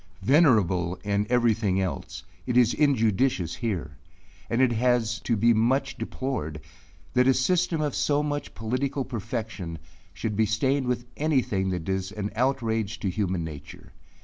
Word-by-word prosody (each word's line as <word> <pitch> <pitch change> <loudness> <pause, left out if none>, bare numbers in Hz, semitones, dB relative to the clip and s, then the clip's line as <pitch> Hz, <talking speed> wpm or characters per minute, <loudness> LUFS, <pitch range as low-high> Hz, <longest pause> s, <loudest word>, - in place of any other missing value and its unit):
Venerable 100 - +3
in 105 0 0
every 120 -2 +4
thing 100 -4 0
else, 95 -1 -4 0.2
it 125 -1 +1
is 120 -2 +5
injudicious 115 - +1
here; 105 -9 -3 0.5
and 115 - 0
it 130 -2 +4
is 120 -1 +1
to 115 - -1
be 115 +3 +4
much 130 +5 +1
deplored, 80 - -4 0.5
that 125 0 +4
a 135 - +5
system 175 +3 +1
of 150 -3 -1
so 145 0 +1
much 145 -1 -4
political 130 +4 -2
perfection, 110 -7 -5 0.3
should 105 +1 -4
be 110 +1 +2
stained 130 +5 +1
with 125 -1 -1
any 150 -4 +2
thing 95 -1 -1
that 90 -3 -2
does 95 0 -2
an 105 -1 -4
outrage 115 -4 0
to 95 - -1
human 95 -3 -1
nature. 75 -3 -9
115 Hz, 155 wpm, -26 LUFS, 100-130 Hz, 0.5 s, is